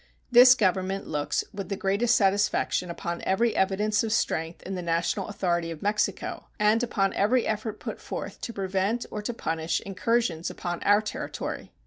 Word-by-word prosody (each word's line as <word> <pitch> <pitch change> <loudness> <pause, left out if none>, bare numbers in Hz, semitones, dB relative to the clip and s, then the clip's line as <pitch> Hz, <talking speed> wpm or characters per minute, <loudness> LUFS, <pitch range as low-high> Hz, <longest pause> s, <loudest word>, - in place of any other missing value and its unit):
This 250 +1 +9
Government 190 -2 0
looks 150 -2 -1
with 195 0 -6
the 200 - -1
greatest 205 +6 +2
satisfaction 195 -2 +1
upon 170 0 -4
every 225 +4 +1
evidence 210 +3 +1
of 225 - -2
strength 165 -7 -1
in 195 - -5
the 185 - -3
national 170 +3 -1
authority 175 -5 -1
of 165 -2 -7
Mexico, 210 +1 -1
and 210 +2 +4
upon 195 -5 0
every 230 +5 +2
effort 215 0 -3
put - - -6
forth - - -6
to - - -4
prevent 195 +3 -1
or 210 - -4
to 210 - -3
punish 160 -7 -2
incursions 195 -3 0
upon 175 -1 -4
our 205 +1 +4
territory. 210 - -5
195 Hz, 165 wpm, -27 LUFS, 180-215 Hz, -, This